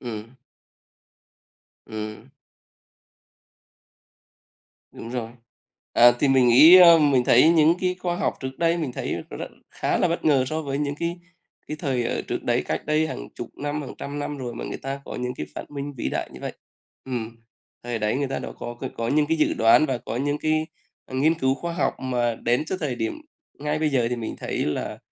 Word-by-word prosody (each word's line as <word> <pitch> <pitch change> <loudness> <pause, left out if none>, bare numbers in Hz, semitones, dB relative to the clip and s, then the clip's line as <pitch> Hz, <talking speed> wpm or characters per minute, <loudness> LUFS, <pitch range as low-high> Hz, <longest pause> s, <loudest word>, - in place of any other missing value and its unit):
Ừm. 115 0 -7 1.5
Ừm. 110 +2 -7 2.6
Đúng 115 - -9
rồi. 120 -3 -4 0.6
À, 120 +1 +7
thì 140 - +2
mình 130 -2 +5
nghĩ 155 +9 +9
ơ, 170 -2 +9
mình 140 -5 +3
thấy 125 +7 +6
những 165 0 +5
cái 180 -1 +1
khoa 175 -1 -1
học - - 0
trước 130 0 -6
đây 170 0 +2
mình 155 -7 -3
thấy - - -3 0.2
r - - -7 0.4
khá - - -1
là 180 - +2
bất 170 - -2
ngờ 140 -4 +4
so 155 +4 -2
với 140 -1 -3
những 145 -1 -1
cái 170 +1 -2 0.5
cái 150 - -5
thời 130 -4 -1
ở - - -2
trước - - -2
đấy, - - +1
cách 80 - -3
đây 155 +1 +2
hàng 160 - -6
chục 120 - -6
năm, 145 +1 -3
hàng 135 - -8
trăm 145 +1 -5
năm 145 0 -4
rồi 125 -2 -5
mà - - -6
người - - -5
ta 135 +1 -5
có - - -7
những 125 0 -3
cái 75 - -5
phát - - -8
minh 145 0 -5
vĩ 115 - -2
đại - - -3
như - - -11
vậy. - - -4 0.5
Ừm, 115 -3 -5 0.5
thời 120 -2 -3
đấy 105 +2 0
người 140 0 -1
ta 135 - -2
đã - - -6
có 120 - -6
cái 130 - -4
có 115 0 -2
những 150 +3 +2
cái 160 +2 +1
dự 155 - +2
đoán 115 +7 +5
và 130 -3 -1
có 120 -1 -6
những 145 +3 -1
cái, 155 0 0 0.4
à, - - -10
nghiên 150 +5 +3
cứu 135 -5 +1
khoa 170 +5 -5
học 170 - 0
mà 120 -2 0
đến 120 +5 0
trước 185 - -3
thời 145 -6 -1
điểm 115 - -3 0.4
ngay 150 +1 -1
bây 155 0 +1
giờ 130 -5 +1
thì 125 - -1
mình 115 -2 -5
thấy - - -2
là 75 - -3
135 Hz, 210 wpm, -24 LUFS, 120-155 Hz, 2.6 s, nghĩ